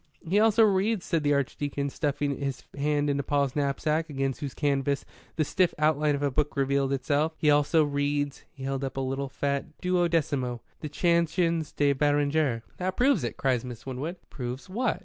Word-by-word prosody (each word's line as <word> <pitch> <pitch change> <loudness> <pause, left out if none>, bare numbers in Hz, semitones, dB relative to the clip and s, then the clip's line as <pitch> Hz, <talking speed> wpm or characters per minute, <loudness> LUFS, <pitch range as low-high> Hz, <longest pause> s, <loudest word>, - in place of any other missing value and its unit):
"He 195 +5 +3
also 225 +1 +5
reads," 205 0 +2
said 165 -2 0
the 145 -1 +2
Archdeacon, 140 0 -2
stuffing 145 -1 -1
his 140 -2 -3
hand 145 +1 +1
into 140 -1 +1
Paul's 140 -1 0
knapsack, 150 +3 0
against 135 -2 -2
whose 140 -3 -5
canvas 140 -1 0 0.3
the 155 - +1
stiff 185 +3 +1
outline 150 -1 +2
of 140 - -3
a 140 - +1
book 150 +2 -1
revealed 140 0 +1
itself 145 +4 +1
"he 150 - +3
also 150 +2 +4
reads" 145 0 -1
he 135 - -11
held 135 0 -2
up 135 0 -4
a - - +1
little 135 +1 -2
fat 140 +2 -3
duodecimo 165 -9 0 0.2
"the 150 - -5
Chansons 170 0 +1
de 145 -1 +2
Beranger." 145 -3 +1
"That 185 +1 -2
proves 270 +2 +3
it," - - -3
cried 130 -3 +1
Miss 120 -3 -8
Winwood. 135 +7 -4 0.2
"Proves 125 0 -5
what?" 230 +5 -1
145 Hz, 180 wpm, -27 LUFS, 140-160 Hz, 0.3 s, also